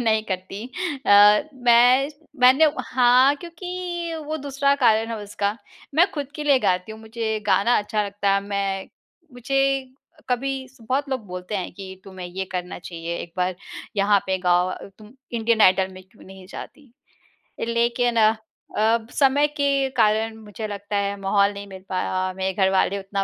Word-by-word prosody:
नहीं 220 Hz, -2 st, +2 dB
करती। 190 Hz, +2 st, -5 dB, 0.4 s
अ, 205 Hz, +1 st, +7 dB
मैं 250 Hz, +2 st, +5 dB, 0.3 s
मैंने 260 Hz, +5 st, +6 dB, 0.2 s
हाँ, 255 Hz, +2 st, +4 dB
क्योंकि 345 Hz, 0 st, -5 dB
वो 310 Hz, +1 st, -2 dB
दूसरा 280 Hz, -1 st, +1 dB
कारण 225 Hz, -4 st, +3 dB
है 230 Hz, -, -3 dB
उसका, 205 Hz, +1 st, -2 dB, 0.4 s
मैं 345 Hz, +5 st, +4 dB
खुद 285 Hz, -3 st, -5 dB
के 300 Hz, -, -5 dB
लिए 285 Hz, -2 st, +4 dB
गाती 185 Hz, -2 st, 0 dB
हूँ, 220 Hz, -, -11 dB
मुझे 220 Hz, 0 st, -3 dB
गाना 230 Hz, +4 st, +3 dB
अच्छा 210 Hz, 0 st, -1 dB
लगता 200 Hz, 0 st, 0 dB
है। 200 Hz, -, +2 dB
मैं 195 Hz, -1 st, -3 dB, 0.4 s
मुझे 245 Hz, +3 st, -2 dB, 0.7 s
कभी 255 Hz, +2 st, 0 dB, 0.2 s
स 260 Hz, -, -24 dB
बहुत 265 Hz, +5 st, -2 dB
लोग 260 Hz, -5 st, -3 dB
बोलते 180 Hz, +2 st, -5 dB
हैं 185 Hz, -, -4 dB
कि, 190 Hz, 0 st, -10 dB
"तुम्हें 190 Hz, -2 st, -8 dB
ये 185 Hz, +2 st, -4 dB
करना 180 Hz, -1 st, -4 dB
चाहिए, 170 Hz, -1 st, -6 dB
एक 170 Hz, -, -8 dB
बार 180 Hz, 0 st, 0 dB, 0.4 s
यहाँ 200 Hz, 0 st, +4 dB
पे 190 Hz, 0 st, 0 dB
गाओ 180 Hz, 0 st, +2 dB
अ, 185 Hz, -, -7 dB
तुम 215 Hz, +2 st, -15 dB, 0.2 s
इंडियन 230 Hz, -1 st, +1 dB
आइडल 185 Hz, -1 st, +5 dB
में 185 Hz, 0 st, -12 dB
क्यों 190 Hz, +4 st, -21 dB
नहीं 190 Hz, -1 st, -13 dB
जाती?" 270 Hz, +6 st, -11 dB, 0.8 s
लेकिन 235 Hz, +1 st, +1 dB
अ 220 Hz, 0 st, +5 dB, 0.4 s
अ, 220 Hz, +2 st, +3 dB
ब 225 Hz, -, -14 dB
समय 285 Hz, +1 st, +3 dB
के 280 Hz, -2 st, 0 dB
कारण 220 Hz, 0 st, +2 dB
मुझे 215 Hz, 0 st, -8 dB
लगता 205 Hz, 0 st, -5 dB
है, 200 Hz, 0 st, 0 dB
माहौल 200 Hz, +1 st, +2 dB
नहीं 200 Hz, 0 st, -8 dB
मिल 190 Hz, -1 st, -10 dB
पाया 185 Hz, -, -2 dB
और 185 Hz, -, -3 dB
मेरे 190 Hz, 0 st, -2 dB
घर 190 Hz, 0 st, +2 dB
वाले 195 Hz, +1 st, +2 dB
उतना 195 Hz, 0 st, -3 dB
215 Hz, 175 wpm, -23 LUFS, 195-255 Hz, 0.8 s, अ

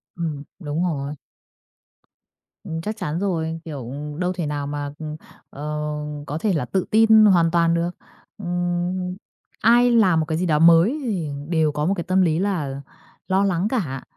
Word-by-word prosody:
Ừm, 155 Hz, -4 st, -4 dB, 0.2 s
đúng 155 Hz, +1 st, -2 dB
rồi. 145 Hz, -4 st, -2 dB, 1.5 s
Ừm, 160 Hz, 0 st, -4 dB
chắc 215 Hz, +4 st, -4 dB
chắn 155 Hz, +3 st, -3 dB
rồi, 165 Hz, -4 st, -1 dB
kiểu, 135 Hz, -7 st, -6 dB, 0.3 s
đâu 180 Hz, 0 st, 0 dB
thể 175 Hz, -3 st, -3 dB
nào 145 Hz, -1 st, -3 dB
mà, 145 Hz, 0 st, -4 dB
ừm, 155 Hz, -1 st, -5 dB, 0.3 s
ờ, 145 Hz, -, -11 dB, 0.7 s
có 150 Hz, -, -3 dB
thể 205 Hz, +3 st, 0 dB
là 150 Hz, -7 st, 0 dB
tự 185 Hz, +8 st, -1 dB
tin 220 Hz, 0 st, +6 dB
hoàn 170 Hz, -5 st, +4 dB
toàn 170 Hz, -1 st, +3 dB
được. 170 Hz, +1 st, 0 dB, 0.5 s
Ừm, 175 Hz, 0 st, -2 dB, 0.5 s
ai 240 Hz, +2 st, +5 dB
làm 190 Hz, -8 st, +4 dB
một 155 Hz, -, 0 dB
cái 160 Hz, 0 st, -2 dB
gì 180 Hz, -, 0 dB
đó 150 Hz, -3 st, +2 dB
mới 170 Hz, -, +5 dB
thì 190 Hz, -, -2 dB, 0.2 s
đều 160 Hz, -3 st, +2 dB
có 150 Hz, +1 st, -2 dB
một 195 Hz, -, +2 dB
cái 170 Hz, -, -2 dB
tâm 185 Hz, +2 st, +2 dB
lý 165 Hz, -2 st, +2 dB
là 155 Hz, -9 st, -2 dB, 0.5 s
lo 190 Hz, +1 st, +2 dB
lắng 190 Hz, 0 st, +1 dB
cả, 150 Hz, -, -2 dB
170 Hz, 175 wpm, -22 LUFS, 155-190 Hz, 1.5 s, tin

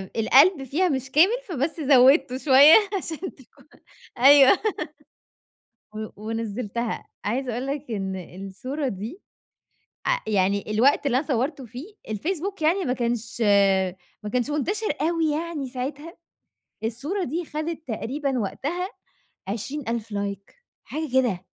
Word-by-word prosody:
القلب 275 Hz, -, +5 dB
فيها 340 Hz, +8 st, 0 dB
مش 270 Hz, -1 st, -3 dB
كامل، 350 Hz, -, +5 dB, 0.2 s
فبس 310 Hz, +1 st, -2 dB
زودته 265 Hz, -1 st, +5 dB
شوية 280 Hz, +2 st, +7 dB, 0.2 s
عشان 340 Hz, +1 st, -6 dB
تكون 265 Hz, -, -21 dB, 0.5 s
أيوه، 275 Hz, +1 st, +8 dB, 1.4 s
و 215 Hz, 0 st, -5 dB, 0.2 s
ونزلتها. 225 Hz, +1 st, -3 dB, 0.2 s
عايزة 245 Hz, +4 st, -1 dB
أقول 250 Hz, +4 st, -3 dB
لك 285 Hz, +1 st, -4 dB
إن 190 Hz, -3 st, -3 dB, 0.3 s
الصورة 260 Hz, +9 st, -4 dB
دي، 225 Hz, -, -6 dB, 0.9 s
ع -, -, +2 dB
يعني 200 Hz, 0 st, +1 dB
الوقت 260 Hz, +7 st, +3 dB
اللي 255 Hz, -1 st, +2 dB
أنا 295 Hz, -, -3 dB
صورته 270 Hz, +1 st, -1 dB
فيه، 275 Hz, -, -10 dB
الفيسبوك 345 Hz, -, -3 dB
يعني 360 Hz, +5 st, +2 dB
ما 250 Hz, -, 0 dB
كانش 235 Hz, -1 st, -3 dB, 0.8 s
ما 210 Hz, -, -5 dB
كانش 250 Hz, +3 st, 0 dB
منتشر 395 Hz, +10 st, -1 dB
أوي 325 Hz, 0 st, +1 dB
يعني 305 Hz, -3 st, -3 dB
ساعتها. 275 Hz, +6 st, -6 dB, 0.7 s
الصورة 285 Hz, -, -2 dB
دي 330 Hz, +5 st, -3 dB
خدت 315 Hz, 0 st, -5 dB
تقريبًا 260 Hz, +3 st, -2 dB
وقتها 340 Hz, -, -3 dB, 0.6 s
20.000 230 Hz, 0 st, -4 dB
لايك 200 Hz, -, -5 dB, 0.3 s
حاجة 310 Hz, -1 st, -5 dB
كده. 225 Hz, -9 st, +1 dB
270 Hz, 120 wpm, -24 LUFS, 230-310 Hz, 1.4 s, أيوه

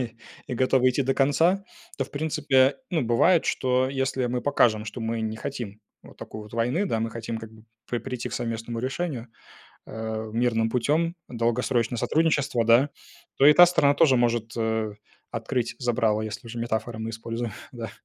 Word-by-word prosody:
и 120 Hz, -2 st, -4 dB, 0.3 s
и -, -, -4 dB
готова 130 Hz, +1 st, +3 dB
идти 130 Hz, +2 st, +1 dB
до 135 Hz, +1 st, +1 dB
конца, 165 Hz, +8 st, +3 dB, 0.4 s
то, 135 Hz, -, 0 dB
в -, -, -16 dB
принципе, 140 Hz, -3 st, +2 dB
ну, 165 Hz, -5 st, 0 dB
бывает, 125 Hz, +9 st, +3 dB
что, 130 Hz, 0 st, +1 dB
если 135 Hz, -1 st, -1 dB
мы 125 Hz, 0 st, -1 dB
покажем, 115 Hz, -6 st, +2 dB
что 110 Hz, +2 st, -6 dB
мы 115 Hz, 0 st, -2 dB
не 110 Hz, 0 st, -3 dB
хотим 115 Hz, -5 st, -6 dB, 0.2 s
вот -, -, -15 dB
такой 110 Hz, -, -8 dB
вот 105 Hz, +1 st, -12 dB
войны, 125 Hz, -, +1 dB
да, 115 Hz, -, -1 dB
мы 115 Hz, 0 st, -2 dB
хотим, 115 Hz, 0 st, -5 dB
как 110 Hz, 0 st, -10 dB
бы, 110 Hz, 0 st, -17 dB, 0.3 s
при 120 Hz, -, 0 dB
прийти 125 Hz, +1 st, -5 dB
к -, -, -10 dB
совместному 115 Hz, -1 st, -3 dB
решению, 130 Hz, -1 st, -3 dB, 0.6 s
э, 110 Hz, 0 st, -5 dB
мирным 115 Hz, -1 st, +1 dB
путем, 150 Hz, +8 st, +1 dB
долгосрочное 120 Hz, 0 st, 0 dB
сотрудничество, 140 Hz, -3 st, +1 dB
да, 120 Hz, +5 st, +5 dB, 0.5 s
то 135 Hz, -, +5 dB
и 150 Hz, -, +9 dB
та 175 Hz, +3 st, +9 dB
сторона 145 Hz, -5 st, +3 dB
тоже 145 Hz, -6 st, +5 dB
может, 120 Hz, -2 st, 0 dB
э, 110 Hz, -1 st, -1 dB, 0.4 s
открыть 120 Hz, +1 st, -2 dB
забрало, 115 Hz, -4 st, +1 dB
если 110 Hz, +3 st, -6 dB
уже 115 Hz, +1 st, -7 dB
метафоры 115 Hz, -1 st, -3 dB
мы 110 Hz, +1 st, -3 dB
используем. 115 Hz, 0 st, -4 dB, 0.2 s
Да. 115 Hz, -2 st, -6 dB
120 Hz, 180 wpm, -25 LUFS, 115-135 Hz, 0.6 s, и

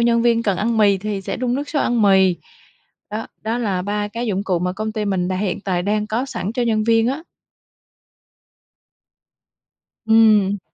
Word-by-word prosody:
nhân 235 Hz, 0 st, +3 dB
viên 235 Hz, -1 st, +2 dB
cần 200 Hz, -4 st, 0 dB
ăn 225 Hz, +4 st, 0 dB
mì 200 Hz, -2 st, +4 dB
thì 205 Hz, 0 st, -3 dB
sẽ -, -, -4 dB
đun 250 Hz, -1 st, -1 dB
nước 285 Hz, +2 st, -3 dB
sôi 295 Hz, -, 0 dB
ăn 240 Hz, -2 st, +1 dB
mì. 190 Hz, -3 st, +4 dB, 0.7 s
Đó, 215 Hz, +1 st, -4 dB, 0.2 s
đó 225 Hz, +2 st, -2 dB
là 200 Hz, -6 st, -1 dB
3 205 Hz, +1 st, -2 dB
cái 230 Hz, +3 st, -4 dB
dụng 200 Hz, -2 st, -1 dB
cụ 185 Hz, -5 st, 0 dB
mà 180 Hz, +1 st, -2 dB
công 215 Hz, +3 st, -4 dB
ty 215 Hz, -1 st, -2 dB
mình 185 Hz, -3 st, -1 dB
đã 185 Hz, -, -1 dB
hiện 195 Hz, 0 st, -2 dB
tại 185 Hz, -3 st, -1 dB
đang 210 Hz, +2 st, -1 dB
có 235 Hz, +5 st, -2 dB
sẵn 215 Hz, -6 st, -4 dB
cho 245 Hz, +1 st, -1 dB
nhân 220 Hz, -2 st, +1 dB
viên 225 Hz, 0 st, +3 dB
á. 275 Hz, +5 st, -3 dB, 2.8 s
Ừm. 215 Hz, -3 st, +4 dB
215 Hz, 190 wpm, -20 LUFS, 195-230 Hz, 2.8 s, mì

